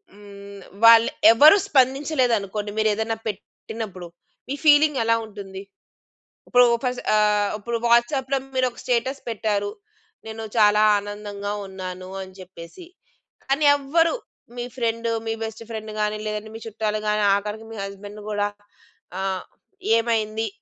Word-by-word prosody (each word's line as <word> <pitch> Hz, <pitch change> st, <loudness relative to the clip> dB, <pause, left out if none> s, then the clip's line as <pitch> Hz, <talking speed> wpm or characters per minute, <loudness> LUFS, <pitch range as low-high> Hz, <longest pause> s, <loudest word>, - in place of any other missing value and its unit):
హ్మ్. 200 Hz, -1 st, -12 dB, 0.2 s
వాళ్ళు 230 Hz, 0 st, +8 dB, 0.2 s
ఎవరూ 300 Hz, -, +8 dB
స్పందించలేదనుకోండి 250 Hz, -7 st, +1 dB
మీరేదైనా 220 Hz, +1 st, 0 dB
పెట్టినప్పుడు, 205 Hz, -2 st, -7 dB, 0.4 s
మీ 280 Hz, -, -2 dB
ఫీలింగ్ 295 Hz, -2 st, +5 dB
ఎలా 230 Hz, 0 st, +3 dB
ఉంటుంది? 195 Hz, -3 st, -9 dB, 0.9 s
ఇప్పుడు 245 Hz, 0 st, +5 dB, 0.2 s
ఫస్ట్ 250 Hz, -1 st, -2 dB
ఆహ్, 210 Hz, -1 st, +2 dB
ఇప్పుడు 235 Hz, +3 st, -3 dB
వాట్సాప్‌లో 260 Hz, +3 st, +2 dB, 0.2 s
మీరొక 255 Hz, -2 st, -1 dB
స్టేటస్ 255 Hz, +3 st, -1 dB
పెట్టారు. 205 Hz, -2 st, -1 dB, 0.6 s
నేను 220 Hz, 0 st, -7 dB
చాలా 210 Hz, -1 st, +5 dB, 0.2 s
ఆనందంగా 205 Hz, 0 st, -6 dB, 0.2 s
ఉన్నాను 185 Hz, -1 st, -7 dB
అని 190 Hz, 0 st, -10 dB
చెప్పేసి. 185 Hz, -, -12 dB, 0.6 s
కానీ 275 Hz, +3 st, +1 dB
ఎవ్వరు 325 Hz, +4 st, +1 dB, 0.4 s
మీ 240 Hz, -, -3 dB
ఫ్రెండ్ 230 Hz, -1 st, -1 dB, 0.2 s
మీ 225 Hz, -, 0 dB
బెస్ట్ 220 Hz, +1 st, -6 dB
ఫ్రెండ్ 220 Hz, -1 st, -6 dB
గాని, 210 Hz, 0 st, 0 dB
లేదంటే 215 Hz, 0 st, -4 dB
మీ 225 Hz, -, -8 dB
చుట్టాలు 215 Hz, -1 st, -2 dB
గాని, 210 Hz, 0 st, +1 dB
ఆఖరికి 210 Hz, +2 st, -4 dB
మీ 225 Hz, -, -8 dB
హస్బెండ్ 205 Hz, +1 st, -9 dB
కూడా 205 Hz, 0 st, 0 dB, 0.7 s
ఆహ్, 190 Hz, -1 st, -2 dB, 0.5 s
ఏమైంది? 225 Hz, -1 st, -1 dB
220 Hz, 120 wpm, -23 LUFS, 205-235 Hz, 0.9 s, వాళ్ళు